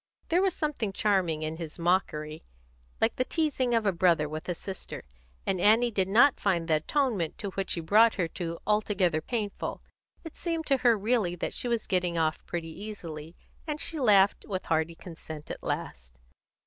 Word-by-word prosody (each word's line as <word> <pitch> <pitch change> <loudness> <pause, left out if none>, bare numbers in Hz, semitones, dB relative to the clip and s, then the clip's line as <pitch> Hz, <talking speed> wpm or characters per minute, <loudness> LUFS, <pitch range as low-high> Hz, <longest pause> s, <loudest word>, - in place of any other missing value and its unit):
There 345 +2 +3
was 380 -2 +1
something 295 -10 -2
charming 185 -6 +1
in 155 +1 -3
his 165 -2 -7
mockery, 160 -3 0 0.6
like - - +1
the 255 - +2
teasing 265 -5 0
of 225 -2 +1
a 200 - +4
brother 170 -4 +3
with 155 +4 -6
a 175 - -1
sister; 190 +2 -7 0.4
and 185 -2 0
Annie 230 +4 +5
did 190 -3 +1
not 245 +8 +5
find 175 -5 0
the 155 -2 +3
atonement 210 - 0
to 200 -2 -5
which 195 0 -2
he 170 - -2
brought 215 +7 +5
her 180 -5 0 0.4
altogether 200 -6 +1
painful. 210 +2 -4 0.4
It 325 - -9
seemed 330 -2 -3
to 275 - +3
her 240 -3 +4
really 205 -4 +1
that 175 - -3
she - - -3
was 235 -2 0
getting 180 -3 0
off 155 -1 0
pretty 170 -2 -4
easily, 170 -5 -8 0.3
and 300 -1 -3
she 320 0 -1
laughed 205 -6 +4
with 185 -3 -3
hearty 160 +1 0
consent 160 -3 -9
at - - -7
last. - - -5
195 Hz, 180 wpm, -28 LUFS, 165-230 Hz, 0.6 s, Annie